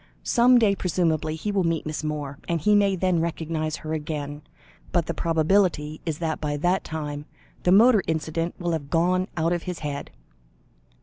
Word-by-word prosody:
"Some 245 +1 +5
day, 215 -4 +4
presumably, 165 -4 0
he 205 +6 -3
will 195 -2 +1
meet 165 -2 -1
Miss 155 0 -4
Moore, 145 -2 -4
and 170 -1 +1
he 210 +7 +3
may 200 -2 +4
then 180 -2 +1
recognise 160 -1 -2
her 155 0 -5
again. 150 -1 -4 0.5
But 170 -2 +1
the 170 - -3
probability 165 -2 +1
is 155 -2 -1
that 160 -2 -3
by 145 -1 -1
that 175 +5 +1
time, 150 -2 -5 0.4
the 180 - +2
motor 220 +2 +6
incident 160 +1 -2
will 175 -1 -2
have 150 -4 -3
gone 180 +3 +2
out 165 +2 +1
of 175 - -1
his 180 - -4
head." 145 -1 -4
165 Hz, 180 wpm, -25 LUFS, 155-180 Hz, 0.5 s, motor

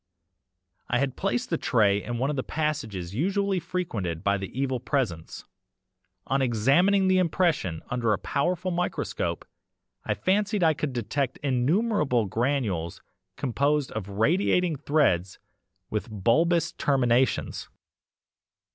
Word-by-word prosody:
I 120 - +2
had 135 0 -1
placed 235 +6 -2
the 165 - 0
tray 105 -5 +2
in 120 +2 -4
one 135 +4 0
of - - -3
the 130 - -1
passages 110 - -3
usually 195 - 0
frequented 100 - -3
by 100 0 +1
the 95 - -5
EVIL 130 -2 0
PRESENCE. 120 - -3 0.8
On 135 +1 0
examining 140 - +3
the 185 0 +4
impression 165 - 0
under 120 -3 +1
a 105 - +2
powerful 180 +5 -1
microscope 180 +1 -2 0.6
I - - -1
fancied 205 +1 +1
I 160 -1 +5
could 150 -1 -3
detect 130 +3 -2
innumerable 145 - +1
granules 110 - -1 0.3
composed 140 +2 0
of 105 -2 -5
radiating 165 - +2
threads 115 - +1 0.5
with 110 +2 -3
bulbous 160 - +2
terminations. 130 -2 +1
135 Hz, 120 wpm, -26 LUFS, 110-170 Hz, 0.8 s, I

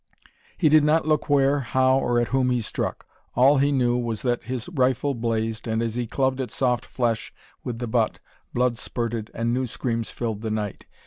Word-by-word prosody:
He 165 - +3
did 155 0 +6
not 155 +1 +2
look 155 -1 +1
where, 140 0 +4
how, 130 +1 +2
or 120 -2 +1
at 120 - 0
whom 130 0 +2
he 125 -1 +1
struck. 110 - -3 0.3
All 135 +3 +5
he 140 +1 +3
knew 125 -3 +2
was 120 -3 -2
that 120 -2 0
his 125 -2 -4
rifle 130 -2 +1
blazed, 115 -1 -2
and 110 0 0
as 115 -2 -2
he 120 0 -2
clubbed 130 +2 0
at 125 - -4
soft 125 -3 0
flesh 115 -3 -1 0.3
with 120 -2 -4
the 120 - -3
butt, 115 -1 0 0.3
blood 120 -1 +1
spurted, 115 -2 -3
and 115 +1 0
new 130 +1 0
screams 115 -1 -1
filled 110 -3 -4
the 110 - -3
night. 105 -2 -4
125 Hz, 200 wpm, -24 LUFS, 115-130 Hz, 0.3 s, did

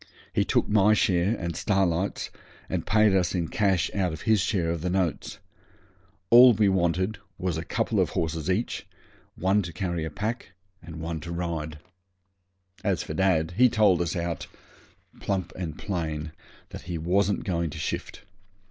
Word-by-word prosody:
He - - +2
took - - +1
my 105 0 +4
share 95 +3 +2
and 85 -3 -4
Starlight's, 95 0 0 0.4
and - - -3
paid 110 -1 +4
us 90 -1 +1
in 85 -3 -1
cash 95 -6 +1
out 95 -3 0
of 80 - -7
his 110 -3 +3
share 90 -4 0
of 85 -2 -3
the 90 - -1
notes. 90 -3 -1 0.9
All 125 +1 +9
we 105 -1 +3
wanted 95 +2 0 0.2
was 90 -3 -2
a 80 - -3
couple - - -1
of - - +2
horses 80 0 -2
each, 105 +6 -1 0.5
one 95 +3 +2
to 85 -3 -6
carry 85 -2 -3
a 80 - -3
pack, 105 +5 -4 0.3
one 80 0 -5
to 85 +2 -7
ride. 85 -3 -3 1.1
As 95 -4 0
for - - -6
dad, 85 -2 +2
he 125 +1 +6
told 100 -6 +3
us 85 +2 -1
out, 85 -3 -3 0.7
plump 95 -3 -2
and 85 -5 -5
plain, 80 -5 -3 0.4
that - - -8
he 85 - -2
wasn't 95 +5 +1
going 85 -3 -1
to - - -8
shift. - - -4
90 Hz, 165 wpm, -26 LUFS, 85-100 Hz, 1.1 s, All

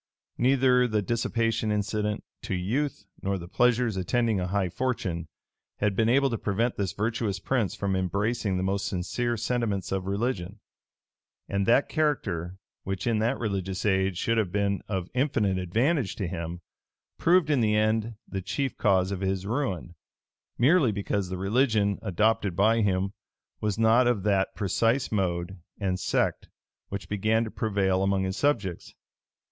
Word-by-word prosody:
Neither 125 0 +4
the 110 -3 0
dissipation 115 0 0
incident 105 0 -1 0.2
to - - -3
youth, 110 +6 -2 0.2
nor 100 0 -1
the 85 -2 -8
pleasures 120 +1 +2
attending 110 +3 +1
a 90 - -1
high 95 0 0
fortune, 90 -8 -2 0.5
had 105 -1 0
been 110 +2 +2
able 135 +2 +3
to 115 - -2
prevent 115 +4 0
this 95 -3 -1
virtuous 110 -1 -1
prince 110 +1 -1
from 100 -1 -1
embracing 100 +2 0
the 90 - -1
most 100 +1 -1
sincere 110 +6 -1
sentiments 110 -3 -1
of 95 -1 -2
religion: 100 -1 -2 0.9
and 100 0 -1
that 120 +4 +4
character, 95 - -1 0.2
which 95 -1 -4
in 115 -3 +1
that 115 +5 +1
religious 95 -3 -3
age 95 -2 +2
should 115 +4 +1
have 100 -5 -1
been 100 0 0
of 95 -3 -2
infinite 110 -8 +1
advantage 115 - 0
to 100 - -3
him, 85 0 -5 0.6
proved 170 -2 +4
in 140 - +3
the 105 -2 +2
end 110 +1 +1
the 95 - -4
chief 100 +9 -2
cause 95 -3 +3
of 100 -1 -3
his 95 0 -1
ruin; 105 - -2 0.6
merely 135 0 +4
because 100 -2 -2
the 95 - -3
religion 105 0 +2
adopted 105 -1 +1
by 110 +3 +3
him 95 -1 0 0.5
was 105 -1 -1
not 115 +2 +4
of 115 -6 +1
that 100 -2 +1
precise 115 +5 +1
mode 90 -2 -1 0.2
and 95 -3 -1
sect - - 0 0.4
which 100 0 -5
began 110 +3 +1
to 110 - -5
prevail 95 -3 0
among 95 0 +1
his 95 0 -2
subjects. 105 - -1
105 Hz, 155 wpm, -27 LUFS, 95-115 Hz, 0.9 s, Neither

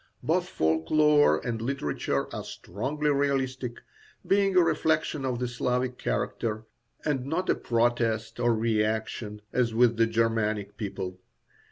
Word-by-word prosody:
Both - - +1
folk 80 0 0
lore 150 -1 +5
and 115 -2 -2
literature 115 - -1
are - - -4
strongly 145 +10 -2
realistic, 130 -3 -1 0.4
being 195 +1 +2
a 180 - +7
reflection 155 -3 +1
of 125 -2 -1
the 125 +1 -1
Slavic 125 +1 -1
character, 110 -1 -2 0.4
and 135 -4 -1
not 175 +5 0
a - - +4
protest 115 -2 0
or 120 -1 +3
reaction, 110 -1 -1
as 120 -3 +1
with 115 -1 +4
the 115 0 +4
Germanic 110 -3 0
people. 95 -3 -5
120 Hz, 135 wpm, -27 LUFS, 110-140 Hz, 0.4 s, a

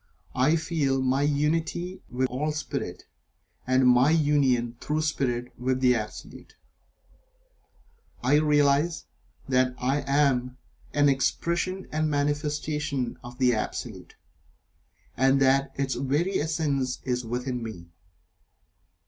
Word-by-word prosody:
I 135 +6 +3
feel 155 -5 0
my 130 +1 +1
unity 160 +5 -1
with 130 +1 0
all 145 +5 -2
Spirit, 155 - -5 0.6
and 130 0 +4
my 125 +3 +5
Union 140 -7 +2
(through 155 +1 -1
Spirit) 125 -5 -1
with 130 +1 0
the 125 -1 +4
Absolute. 110 -3 -7 1.7
I 135 +4 +4
realize 150 +2 +2 0.4
that 130 -1 +2
"I" 135 +3 0
am 135 -3 +1 0.3
an 145 0 +3
Expression 170 +7 0
and 155 0 0
Manifestation 145 -2 -2
of 120 0 -10
the 125 -2 +3
Absolute, 110 - -5 1.0
and 135 +2 +3
that 135 0 +3
its 135 -1 -1
very 155 +8 0
essence 145 -5 -1
is 125 -1 -1
within 125 +2 -3
me. 90 -7 -8
135 Hz, 110 wpm, -26 LUFS, 125-150 Hz, 1.7 s, my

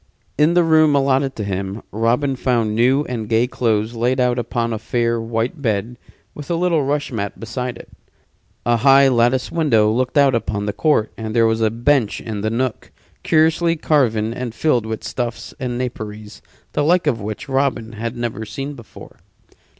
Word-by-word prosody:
In 155 +3 +3
the 175 - +5
room 155 -2 +4
allotted 135 -1 +1
to 105 - -4
him 100 +1 -4
Robin 120 +6 +1
found 120 -4 0
new 130 +5 +3
and 115 -4 -5
gay 115 +1 +3
clothes 115 -3 -1
laid 120 +3 0
out 125 -1 +2
upon 115 -1 -2
a 110 - -3
fair, 115 +1 -1
white 115 +6 -3
bed, 115 -1 -1 0.4
with 145 +1 -9
a 170 - +1
little 170 -3 +1
rush 145 +1 -1
mat 100 -5 -4
beside 125 +3 -4
it. - - -12 0.8
A 120 +1 +3
high 135 +3 +6
latticed 120 +1 +2
window 115 -10 +3
looked 130 +5 -1
out 140 -2 +5
upon 105 -3 -2
the 105 - -2
court, 150 -9 +1
and 110 0 -4
there 115 -1 +4
was 110 0 +1
a 110 - +3
bench 120 +1 +1
in 110 -3 -5
the 110 - 0
nook, 120 +1 -3 0.3
curiously 160 +2 +2
carven 115 -9 +1
and 120 -2 -5
filled 125 -8 +1
with 110 -1 -5
stuffs 120 -2 -4
and 125 -2 -3
naperies 110 -4 -6 0.3
the 145 - +1
like 170 +3 +3
of 120 -7 0
which 105 +1 -6
Robin 135 -4 -1
had 115 +2 -5
never 120 -2 -3
seen 135 +6 -6
before. 120 -5 -13
120 Hz, 180 wpm, -20 LUFS, 110-140 Hz, 0.8 s, high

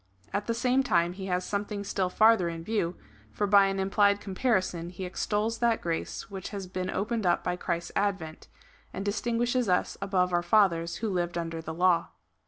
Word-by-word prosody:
At 205 - -2
the 230 - 0
same 250 +2 +2
time 175 -9 +2
he 190 +1 -7
has 180 0 -1
something 205 0 -3
still 190 -2 -1
farther 215 -3 +4
in 165 -1 -6
view, 180 -3 -1 0.4
for 205 - -1
by 200 -1 +6
an 195 0 -2
implied 200 +1 +3
comparison 190 -5 -1
he 185 +1 -6
extols 210 +4 -1
that 235 -2 +2
grace 165 -1 -3
which 195 -2 -7
has 200 -2 -5
been 185 0 -4
opened 215 +1 -1
up 175 - +2
by 180 - -1
Christ's 170 -1 -3
advent, 195 -6 -2 0.5
and 195 - -4
distinguishes 235 +2 0
us 180 - +1
above 185 -2 +1
our 175 - +3
fathers, 175 -3 +2
who - - 0
lived 175 -1 -1
under 165 -1 -3
the 160 0 -6
law. 175 -1 +3
190 Hz, 190 wpm, -28 LUFS, 175-210 Hz, 0.5 s, by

